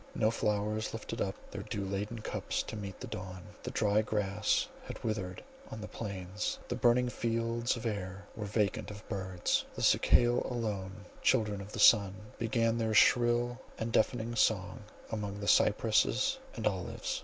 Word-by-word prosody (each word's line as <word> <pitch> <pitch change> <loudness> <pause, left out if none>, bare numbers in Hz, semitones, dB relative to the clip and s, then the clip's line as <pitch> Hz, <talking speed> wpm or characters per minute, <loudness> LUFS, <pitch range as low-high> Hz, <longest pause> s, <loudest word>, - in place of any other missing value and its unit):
No 110 0 +3
flowers 105 0 -1
lifted 115 +1 -5
up 95 - -1 0.2
their 100 - -5
dew 105 -1 -4
laden 105 +4 -3
cups - - -2
to - - -7
meet 100 -3 -6
the - - -6
dawn; 95 -1 -7 0.2
the - - -5
dry 105 0 +2
grass 105 -1 0 0.2
had - - -8
withered 100 -5 -3 0.3
on 110 - -7
the 105 - -6
plains; 100 -1 -4
the 120 - -1
burning 125 0 +4
fields 115 0 0
of 115 - -7
air 100 -3 -3
were 105 -2 -4
vacant 105 -1 0
of 105 0 -10
birds; 95 -4 -1
the - - -4
cicale 120 0 +4
alone, 100 -5 -4 0.2
children 105 -5 +2
of 100 +1 -9
the - - -5
sun, 100 -4 +6 0.2
began 115 0 +1
their 110 -1 0
shrill 120 +2 +4 0.2
and 115 +1 -3
deafening 115 +1 +1
song 100 -4 +2 0.3
among 105 -2 -3
the 100 - -4
cypresses 115 - +3 0.2
and 110 - -4
olives. 95 -4 -2
105 Hz, 165 wpm, -32 LUFS, 100-115 Hz, 0.3 s, sun